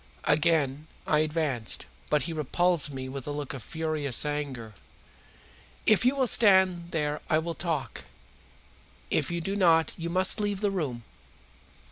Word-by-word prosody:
Again 150 -1 +2 0.2
I 150 - +2
advanced, 150 -7 -1 0.2
but 150 -1 +2
he 165 - -4
repulsed 160 +1 +1
me 130 -1 -5
with 135 0 -7
a - - -2
look 145 -1 -5
of 135 - -7
furious 155 -1 -1
anger. 140 -7 -4 1.1
"If 215 +2 +4
you 255 +3 +4
will 265 -2 +2
stand 190 -7 +4
there 150 -3 -2
I 155 - +4
will 165 +1 -2
talk. 165 -5 -3 1.1
If - - +1
you 170 0 -2
do 195 +4 -3
not 165 -5 +3
you 170 0 -4
must 185 +5 +1
leave 205 -2 -1
the 205 -1 +1
room." 140 -11 -3
155 Hz, 150 wpm, -28 LUFS, 145-175 Hz, 1.1 s, If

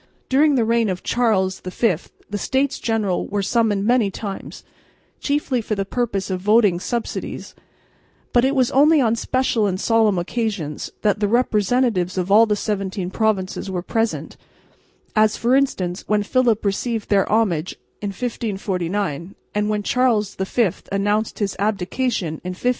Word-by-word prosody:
During 285 +2 +4
the 235 -3 +2
reign 230 -1 +2
of 185 -1 -4
Charles 195 -6 +1
V 185 +2 0 0.3
the 205 - -4
States 270 +5 0
General 215 -5 -1
were 205 -1 -2
summoned 210 -2 +1
many 235 -3 +3
times, 195 0 -7 0.6
chiefly 280 -4 0
for 215 0 -2
the 195 -1 -2
purpose 200 -3 -2
of 185 -1 -2
voting 210 -3 +4
subsidies, 235 +5 -4 0.8
but 240 - +4
it 270 +2 +2
was 255 -3 +2
only 300 +3 +5
on 230 -4 +2
special 235 -3 0
and 185 -1 -2
solemn 220 -3 +3
occasions, 175 -5 -3
that 210 -1 +2
the 205 - +1
representatives 215 -4 +1
of 185 +1 -1
all 225 +3 +7
the 210 - +1
seventeen 195 -3 -3
provinces 200 -3 -1
were 180 -2 -3
present, 225 +3 -2 0.8
as 215 0 +3
for 240 +3 +2
instance 190 -10 0
when 210 -1 +2
Philip 235 -2 +1
received 220 +2 -1
their 200 -2 +2
homage 195 -7 +1 0.3
in 205 - -2
1549 195 - -3 0.2
and 210 0 0
when 210 -1 -1
Charles 230 -4 +1
V 190 +1 0 0.2
announced 205 +2 0
his 200 -3 -2
abdication 200 -3 -1
in 180 0 -4
1555. - - -18
210 Hz, 155 wpm, -21 LUFS, 195-235 Hz, 0.8 s, all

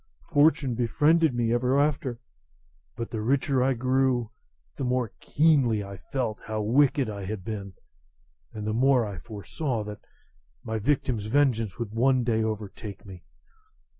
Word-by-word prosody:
Fortune 145 -4 +4
befriended 145 +6 +3
me 120 -1 +1
ever 125 +3 +2
after; 140 -5 0 0.8
but 115 - -5
the 110 - -3
richer 130 +2 +1
I 135 +1 +3
grew, 130 -2 +1 0.4
the - - -4
more 125 -3 0
keenly 135 -9 +2
I 100 0 -8
felt 115 - -3
how 110 -1 -2
wicked 135 +3 +3
I 100 -2 -5
had 100 -2 -5
been, 100 -3 -5 0.8
and 105 -1 -6
the 110 - -1
more 125 0 +3
I 100 -4 -6
foresaw 110 - -4
that 105 0 -7 0.6
my 110 -1 -3
victim's 120 -3 0
vengeance 115 -6 +1
would 115 -3 -5
some 130 +2 +3
day 115 -2 +1
overtake 105 -2 -5
me. 95 -3 -11
120 Hz, 145 wpm, -27 LUFS, 110-135 Hz, 0.8 s, Fortune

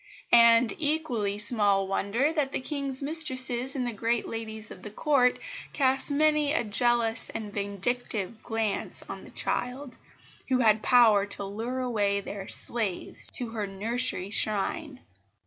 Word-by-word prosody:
And 235 0 +6
equally 275 -10 -1
small 205 -3 +4
wonder 225 +10 -1
that 290 -4 -1
the - - -1
King's 275 0 -3
mistresses 265 -4 +2
and 255 -2 -2
the 240 - -4
great 230 +2 -2
ladies 220 -1 -7
of 180 - -11
the 210 - -8
Court 250 +2 +1 0.4
cast 270 0 +2
many 300 0 +2
a 320 - 0
jealous 230 +1 +1
and 210 -2 -7
vindictive 205 +1 -3
glance 225 -3 -1
on - - -8
the - - -13
child, 250 +1 -3 0.5
who 260 - +2
had 220 -3 +3
power 220 -5 +4
to 200 - -5
lure 225 +6 -5
away 205 -5 0
their 200 -1 -8
slaves 215 -7 -2
to 245 -2 -1
her 215 -3 -4
nursery 200 -1 +1
shrine. 255 - -1
235 Hz, 145 wpm, -27 LUFS, 210-260 Hz, 0.5 s, And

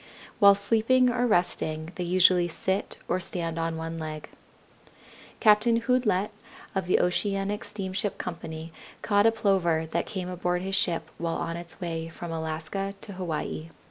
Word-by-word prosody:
While 200 -2 +8
sleeping 230 +5 +3
or 245 0 +1
resting 160 -5 0
they 180 - -4
usually 180 0 +4
sit 190 +3 -2
or 180 - +1
stand 165 -3 -2
on 165 0 -1
one 165 0 -4
leg. 155 -1 -6 1.1
Captain 230 +2 +5
Houdlette 225 -5 +1 0.4
of 190 -2 -1
the - - +4
Oceanic 195 +2 0
Steamship 190 0 -3
Company 165 -2 -6 0.3
caught 205 0 +4
a - - +5
Plover 190 -7 +2
that 170 - -1
came 190 -4 -4
aboard 180 0 -1
his 195 0 -3
ship 165 -4 +1
while 165 -1 -1
on 165 - -3
its 170 +1 -9
way 165 -3 -3
from 165 +1 -7
Alaska 160 +5 -3
to 205 - -7
Hawaii. 165 -3 -4
180 Hz, 150 wpm, -27 LUFS, 165-200 Hz, 1.1 s, While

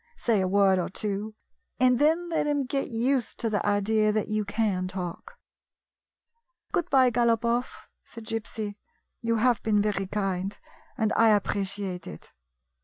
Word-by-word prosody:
Say 225 - +1
a 185 - 0
word 195 -1 +4
or 175 - -2
two, 210 +1 -3 0.4
and 250 -1 +4
then 325 +4 +2
let 325 -2 0
him 290 -2 0
get 275 +1 -2
used 245 +1 0
to 225 - 0
the 205 - 0
idea 210 +1 +2
that 215 0 -1
you 215 0 0
can 200 -3 -1
talk." 185 - -6 1.3
"Good 345 - -1
bye, 260 -2 +5
Galopoff," 235 +1 0 0.2
said 230 -1 -12
Gypsy. 220 -2 -4 0.4
"You 230 -1 0
have 235 0 +2
been 210 -2 +2
very 205 -2 0
kind, 195 -1 -2 0.4
and 220 -3 +1
I 225 0 +5
appreciate 200 -3 -1
it." 75 - -10
215 Hz, 150 wpm, -27 LUFS, 200-240 Hz, 1.3 s, bye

